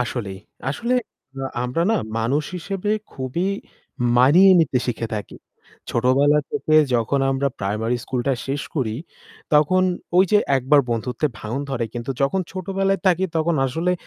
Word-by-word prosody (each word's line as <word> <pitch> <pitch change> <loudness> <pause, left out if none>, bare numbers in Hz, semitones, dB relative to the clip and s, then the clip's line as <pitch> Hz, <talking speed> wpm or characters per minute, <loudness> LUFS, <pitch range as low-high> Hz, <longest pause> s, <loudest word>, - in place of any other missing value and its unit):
আসলেই। 110 -6 -5 0.3
আসলে 235 - -1 0.4
আ - - -4 0.2
আমরা 125 +7 -1
না 225 - +3 0.2
মানুষ 135 +7 0
হিসেবে 195 +3 -3 0.2
খুবই 130 +7 -2 0.7
মানিয়ে 155 +10 +7
নিতে 140 -5 +1
শিখে 120 -2 -2
থাকি। 105 - -6 0.5
ছোটবেলা 135 +5 +3
থেকে 175 -8 0 0.2
যখন 120 +4 +1
আমরা 135 +1 +1
প্রাইমারি 110 +5 -1
স্কুলটা 130 +1 -1
শেষ 135 +1 -2
করি, 120 -8 -1 0.6
তখন 180 +5 +4 0.3
ওই 185 - +7
যে 210 - +7 0.2
একবার 135 +3 +4
বন্ধুত্বে 125 +5 -1
ভাঙন 115 +6 -4
ধরে। 120 -3 -1
কিন্তু 120 +2 -4
যখন 140 +8 +1
ছোটবেলায় 195 +1 -1
থাকি 185 0 +3
তখন 165 +1 +1
আসলে 165 +7 0
140 Hz, 140 wpm, -22 LUFS, 125-175 Hz, 0.7 s, মানিয়ে